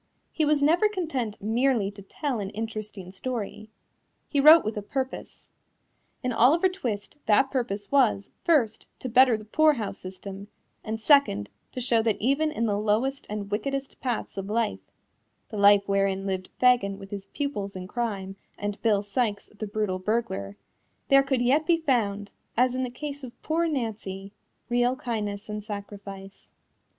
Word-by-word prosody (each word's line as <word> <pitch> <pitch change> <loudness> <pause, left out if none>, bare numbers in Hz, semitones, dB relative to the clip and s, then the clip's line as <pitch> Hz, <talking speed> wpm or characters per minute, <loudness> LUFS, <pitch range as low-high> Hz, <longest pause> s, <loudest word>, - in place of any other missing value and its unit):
He 315 - +1
was 295 -1 +3
never 345 +8 +4
content 280 - -3
merely 225 -2 +2
to 200 0 -12
tell 250 +5 -3
an 195 -1 -3
interesting 215 -3 -6
story. 215 0 -5 0.6
He 285 - 0
wrote 310 +1 +8
with 215 - -2
a 210 - -3
purpose. 260 +5 -5 0.8
In 250 -1 0
Oliver 305 +11 +5
Twist 275 - -5
that 245 +6 +4
purpose 230 -5 -2
was, 240 -8 +3
first, 270 -11 +2
to - - -6
better 250 -1 +5
the 215 - -11
poorhouse 255 -5 +2
system, 195 +2 -8 0.4
and 220 0 -3
second, 220 - +3 0.2
to - - -4
show 235 -2 +2
that 220 -2 0
even 280 +6 +2
in 230 -6 -1
the 205 -2 0
lowest 230 +7 0
and 205 -1 -5
wickedest 275 +6 -3
paths 245 -6 -3
of 195 +1 -4
life 220 -1 0 0.7
(the 215 - -6
life 200 0 +6
wherein 195 -1 +1
lived 190 -1 -3
Fagin 240 -6 +3
with 195 -1 -11
his 200 -1 -6
pupils 210 -10 -4
in 185 0 -6
crime 200 -4 -3 0.2
and 205 0 -4
Bill 210 -3 +2
Sikes 205 0 -2
the 215 +1 -5
brutal 205 -3 -1
burglar) 185 - -2 0.5
there 275 0 +7
could 270 -2 0
yet 285 +5 +3
be 340 -1 +5
found, 210 -10 0 0.3
as 250 +1 +4
in 255 - -1
the 255 - -1
case 285 +2 -6
of 240 -1 -10
poor 335 +2 +1
Nancy, 210 -8 -4 0.3
real 245 +1 +2
kindness 215 -6 -4
and 210 0 -5
sacrifice. 200 -2 -8
220 Hz, 160 wpm, -27 LUFS, 200-265 Hz, 0.8 s, wrote